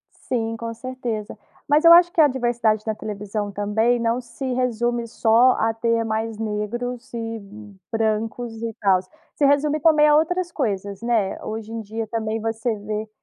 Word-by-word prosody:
Sim, 225 -2 -3
com 230 0 -5
certeza. 235 -4 -5 0.3
Mas 295 +3 +3
eu 335 - +10
acho 345 0 +7
que 330 - +2
a 295 - +7
diversidade 240 -4 0
da 220 - -1
televisão 210 0 -4
também 215 +4 +1
não 230 +2 0
se 255 +2 -5
resume 240 -1 0
só 230 +3 +4
a 225 -2 +1
ter 230 0 0
mais 220 0 -2
negros 225 +4 -4
e 225 -1 -4 0.5
brancos 225 +1 -1
e 230 -1 -3
tal, 190 -2 +4 0.3
se 285 - +2
resume 290 +2 +2
também 305 0 +5
a 295 - +6
outras 345 +3 0
coisas, 200 - -2
né, 230 -5 0
hoje 220 0 -6
em 230 - -4
dia 220 +1 -5
também 220 0 -2
você 225 +1 -1
vê 210 +1 -4
230 Hz, 170 wpm, -22 LUFS, 215-250 Hz, 0.5 s, eu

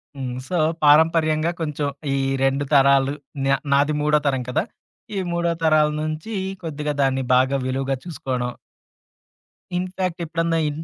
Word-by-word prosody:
హ్మ్. 130 -3 -4
సో, 180 - -1 0.3
పారంపర్యంగా 155 +1 +4
కొంచెం, 150 -2 -2 0.3
ఈ - - +1 0.3
2 135 +1 +1
తరాలు, 140 0 +5 0.3
నా 135 0 +4 0.2
నాది 145 +2 +3
మూడో 150 0 +3
తరం 135 -2 0
కదా! 125 - +1 0.5
ఈ - - +1
మూడో 170 0 0
తరాల 155 -1 +4
నుంచి, 155 +8 -4 0.3
కొద్దిగా 150 -2 -3
దాన్ని 135 -1 +1
బాగా 130 +2 +3
విలువుగా 135 +1 -1
చూసుకోవడం. 130 -7 -3 1.3
ఇన్ 180 +1 -1
ఫ్యాక్ట్ 185 -2 -2
ఎప్పుడన్నా, 165 +1 0
ఇ - - +1
150 Hz, 140 wpm, -22 LUFS, 135-160 Hz, 1.3 s, తరాలు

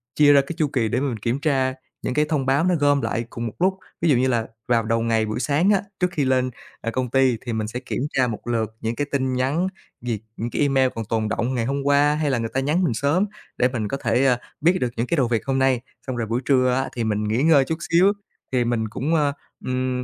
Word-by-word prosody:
chia 145 -1 +6
ra 140 - +6
cái 140 +5 -7
chu 155 - +2
kỳ 125 -5 0
để - - 0
mà 140 - 0
mình 115 -4 -5
kiểm 115 +5 -1
tra 135 -4 +1 0.3
những - - -1
cái 150 +3 +2
thông 145 -5 0
báo 135 +4 +2
nó 180 -1 +3
gom 145 -1 +3
lại 115 -2 -2
cùng 120 0 -5
một 110 - -6
lúc. 190 +2 +2 0.2
Ví 170 - +2
dụ 135 - +5
như 130 +2 +2
là 120 -3 0 0.2
vào 115 -2 +2
đầu 115 +1 0
ngày 115 -1 +1
buổi 110 +2 -3
sáng 150 +8 +2
á, 200 -2 +4 0.2
trước 180 -1 +1
khi 150 -5 0
lên, 130 -1 +2 0.3
ờ, 115 - -2
công 130 +1 -2
ty 130 -2 +3
thì 120 - -2
mình 110 -1 -2
sẽ 120 +3 -4
kiểm 125 - -4 0.2
tra 130 -1 +4
một 115 0 -6
lượt 110 -2 -1
những 115 +1 -2
cái 145 +2 -2
tin 130 -2 0
nhắn, 135 +8 0 0.3
việc 115 -3 -2 0.2
những 115 +2 -3
cái - - -2
email 135 -2 +3
còn 115 -1 -4
tồn 110 0 -1
đọng 120 +4 -1
ngày 115 -2 0
hôm 140 +3 -1
qua 145 +1 +3
hay 150 -1 0
là 130 - +1
người 115 -1 -2
ta 135 - +1
nhắn 150 +7 +1
mình 145 - +1
sớm 145 - +1 0.3
để 125 - +4
mình 120 -5 -3
có 135 - -3
thể, 120 +3 +2
ơ, 125 -3 +4 0.2
biết 175 +4 +4
được 125 - +1
những 115 - -1
cái 170 - 0
đầu 130 -4 +3
việc 115 -2 -1
hôm 135 -1 0
nay, 130 -2 +2 0.3
xong 130 - -2
rồi 120 -2 -2
buổi 115 +3 -1
trưa 130 -2 +3
á 135 +1 0
thì 120 - -1
mình 105 -1 0
nghỉ 110 +5 0
ngơi 150 -4 +5
chút 160 +3 -2
xíu 185 +4 +5 0.4
thì 125 -2 +2
mình 115 -2 0
cũng, 145 +9 -1
ơ, 145 -3 +2 0.3
ừm, 130 0 -1
130 Hz, 280 wpm, -23 LUFS, 115-145 Hz, 0.4 s, chia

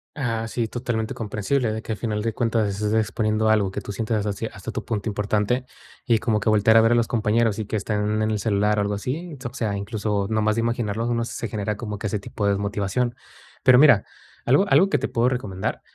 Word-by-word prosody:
Ah, 115 -5 -2
sí, 115 0 -2
totalmente 115 -1 -3
comprensible, 115 +3 -1
de 110 - -3
que 110 - -5
al - - -3
final 105 -3 -2
de 115 0 -2
cuentas 115 -2 +1
estés 105 +1 -2
exponiendo 110 0 +1
algo 105 -3 +3
que - - -4
tú - - -7
sientas 110 0 -1
hacia 105 +2 -3
hasta 95 -1 -7
tu - - -5
punto 110 -1 -3
importante, 105 +4 0 0.4
y 115 -4 +3
como 110 -1 +1
que 105 +1 +1
voltear 110 +1 +4
a 115 - +7
ver 115 +1 +4
a - - +5
los 120 -1 +2
compañeros 115 -1 +1
y 110 - -2
que 105 - -3
están 105 +1 -1
en 110 0 +1
el 105 - 0
celular, 105 0 +1
algo 100 0 0
así. 145 - -4
O 125 -2 -6
sea, 110 -6 -1
incluso, 100 0 -2
nomás 110 -1 +1
de - - +2
imaginarlos, 115 -1 -1
uno 115 -1 0
se 115 0 -5
genera 105 0 -3
como 105 -3 -4
que 105 - -3
ese 105 - -1
tipo 100 +1 -4
desmotivación. 100 +4 0 0.5
Pero 130 -2 +7
mira, 135 -8 +6 0.4
algo 140 +11 +4
algo 195 0 +5
que 145 - +2
te 135 - -2
puedo 120 +2 +2
recomendar 105 -7 -3
110 Hz, 225 wpm, -23 LUFS, 105-115 Hz, 0.5 s, a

